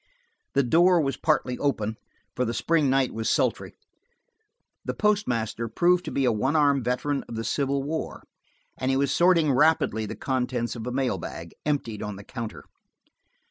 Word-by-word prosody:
The 140 - +4
door 175 +7 +4
was 135 -4 0
partly 135 -5 0
open, 110 -6 -1 0.4
for 125 - 0
the 115 -1 -2
spring 160 -4 +2
night 135 -1 +2
was 110 0 -2
sultry. - - 0 1.1
The - - -4
postmaster 120 - 0
proved 175 +9 +2
to - - -4
be 135 - 0
a - - +4
one 130 +7 0
armed 140 -3 +3
veteran 135 +4 -1
of 115 - -6
the 115 - -3
Civil 140 +2 0
War, 160 +3 -4 0.6
and 130 - -1
he 135 - +2
was 140 0 +1
sorting 170 -2 +4
rapidly 130 -6 +2
the - - -6
contents 125 -2 -2
of 115 0 -6
a - - -2
mail 130 0 -1
bag, 85 0 -8
emptied 115 -8 -1
on 105 -1 -4
the 100 - -10
counter. 115 -1 -7
135 Hz, 175 wpm, -26 LUFS, 115-150 Hz, 1.1 s, The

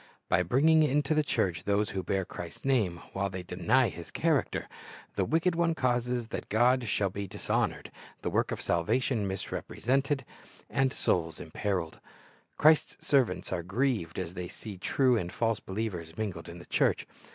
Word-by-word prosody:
By - - +4
bringing 145 - +4
into 150 0 +2
the 155 - +4
church 90 - -1
those 105 +1 +1
who 95 - -2
bear 95 0 -1
Christ's 85 +5 -8
name 105 -11 +1
while 100 0 -1
they 95 -1 -5
deny 110 +8 +2
His 85 0 -9
character, 160 -4 0 0.5
the - - +1
wicked 165 +3 +2
one 165 -1 +1
causes 125 -3 0
that - - -5
God 120 +3 +3
shall 100 -2 +1
be 100 0 -4
dishonored, - - -1 0.3
the - - -1
work - - +1
of - - -3
salvation 105 +6 +1
misrepresented, 135 - -1 0.5
and 135 0 +2
souls 85 -8 0
imperiled. 90 0 -3 0.6
Christ's 155 +1 +4
servants 130 -10 +2
are 85 - -1
grieved 100 -2 -1
as 90 -2 -3
they 90 -1 -5
see 100 +1 -8
true 130 +5 +3
and 90 -4 -3
false 115 0 0
believers 95 -5 -4
mingled 95 -7 -4
in 85 - -8
the 85 - -11
church. - - +1
105 Hz, 165 wpm, -30 LUFS, 90-130 Hz, 0.6 s, By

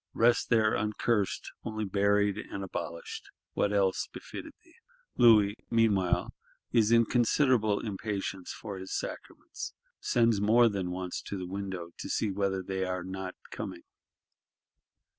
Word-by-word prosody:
Rest 120 +1 +3
there 110 -2 +4
uncursed; 105 0 0
only 110 -1 -3
buried 100 +1 +2
and 100 -2 -6
abolished: 85 -3 -6 0.2
what 100 - +1
else 100 -2 +1
befitted - - -8
thee? - - -23 0.4
Louis, 105 -4 +6
meanwhile, 95 -6 +2 0.4
is 115 -2 +4
in 115 0 +6
considerable 120 -3 +3
impatience 100 -2 -4
for 100 -4 -7
his 95 - -4
sacraments; - - -7 0.2
sends 115 -4 +2
more 115 +3 +5
than 95 -4 -2
once 90 0 -4
to 100 - -5
the 90 - -4
window, 95 -2 -5
to - - -5
see 105 - 0
whether 95 -1 -1
they 95 0 -2
are 90 -1 -2
not 95 0 -5 0.2
coming. - - -6
100 Hz, 135 wpm, -30 LUFS, 95-110 Hz, 0.4 s, Louis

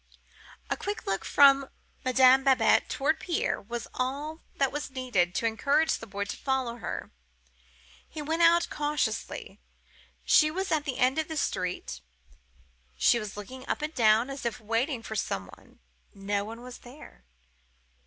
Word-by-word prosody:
"A - - +2
quick 410 +1 -5
look 195 0 -1
from 275 -1 +5 0.3
Madame 260 +1 +5
Babette 265 -1 +4
towards 300 +3 0
Pierre 345 - -1
was 235 +3 -6
all 285 +5 -3
that 275 -2 +1
was 295 0 -4
needed 245 -10 0
to - - 0
encourage 280 +8 +2
the 225 - -9
boy 200 0 -3
to 200 - -5
follow 260 -3 -2
her. - - -6 1.0
He 310 - -8
went 320 +3 -1
out 340 +1 +5
cautiously. 295 0 -2 0.7
She 305 - +5
was 380 +5 -3
at 305 -2 +1
the 265 -4 -3
end 255 +4 +2
of 315 - -1
the 315 - -5
street. 180 - -3 1.0
She 235 - +4
looked 205 +2 -8 0.2
up - - -1
and 305 +1 -3
down, 225 +1 +3
as 275 - -7
if 235 -2 -2
waiting 230 +3 -1
for 220 - -6
some 95 - -3
one. - - -22 0.4
No 200 +1 -2
one 230 +2 -9
was 250 -1 -10
there. 245 - -14
255 Hz, 155 wpm, -28 LUFS, 220-295 Hz, 1.0 s, from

